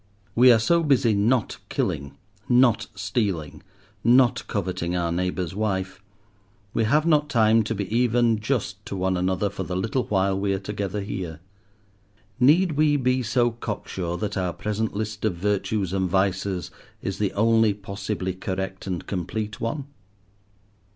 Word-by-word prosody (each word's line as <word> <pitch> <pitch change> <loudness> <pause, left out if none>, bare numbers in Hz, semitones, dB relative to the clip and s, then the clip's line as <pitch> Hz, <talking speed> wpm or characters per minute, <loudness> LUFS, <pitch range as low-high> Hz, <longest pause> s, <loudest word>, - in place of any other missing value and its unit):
We 125 +2 +7
are 115 - +6
so 170 +10 +3
busy 135 -7 +3
not 110 +3 +1
killing, 70 0 -2 0.3
not 120 -3 +4
stealing, 95 - -2 0.4
not 125 +1 +4
coveting 90 -3 -2
our 85 -1 0
neighbour's 90 0 -2
wife, 95 -2 -2 0.7
we 115 - +1
have 150 +7 +3
not 150 -3 +3
time 110 -1 +4
to 115 - -2
be 100 -1 -3
even 120 -2 +3
just 105 -4 -2
to - - -4
one 95 0 0
another 95 +2 0
for 100 -1 -5
the 90 -1 -3
little 110 +6 -1
while 95 -1 +1
we 100 0 0
are - - -3
together 100 0 -3
here. 90 -6 -5 1.0
Need 160 +8 +5
we 150 0 +3
be 130 -1 +1
so 120 0 +2
cocksure 95 -6 -4
that 105 +2 -3
our 90 -2 -1
present 105 +2 -2
list 105 -1 -4
of 110 -5 +1
virtues 100 0 -1
and 95 -1 0
vices 95 -1 0 0.3
is 95 - -3
the 105 -2 +1
only 110 +1 +4
possibly 100 -1 -4
correct 95 +1 -4
and 90 -3 -3
complete 105 +3 -4
one? 135 +5 -2
105 Hz, 150 wpm, -24 LUFS, 95-115 Hz, 1.0 s, We